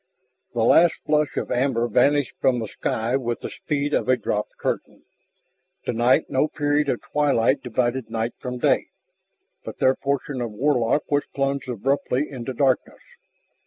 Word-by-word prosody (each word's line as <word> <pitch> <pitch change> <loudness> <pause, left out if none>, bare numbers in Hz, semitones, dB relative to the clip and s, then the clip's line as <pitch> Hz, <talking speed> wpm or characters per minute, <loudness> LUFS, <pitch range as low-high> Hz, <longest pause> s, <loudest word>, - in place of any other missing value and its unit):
The 115 - +1
last 165 +8 +5
flush 150 -1 +1
of - - -2
amber 125 -2 +1
vanished 140 +4 +2
from 130 -2 +2
the 115 -2 -3
sky 115 +4 -2
with 120 -3 -2
the - - -5
speed 145 -1 -2
of - - 0
a 130 - +4
dropped 105 -2 -3
curtain. - - -4 0.8
Tonight 120 +2 +3
no 135 +2 +1
period 145 -1 0
of 120 - -1
twilight 140 -2 +2
divided 125 -1 -1
night 115 +1 -2
from 125 -1 -5
day, - - +2 0.8
but - - -8
their 130 - +4
portion 140 -1 -2
of 120 - -2
Warlock 130 +2 +1
was 145 0 +2
plunged 135 -1 -1
abruptly 135 +4 0
into 130 -1 -5
darkness. 130 0 0
130 Hz, 155 wpm, -23 LUFS, 120-145 Hz, 0.8 s, last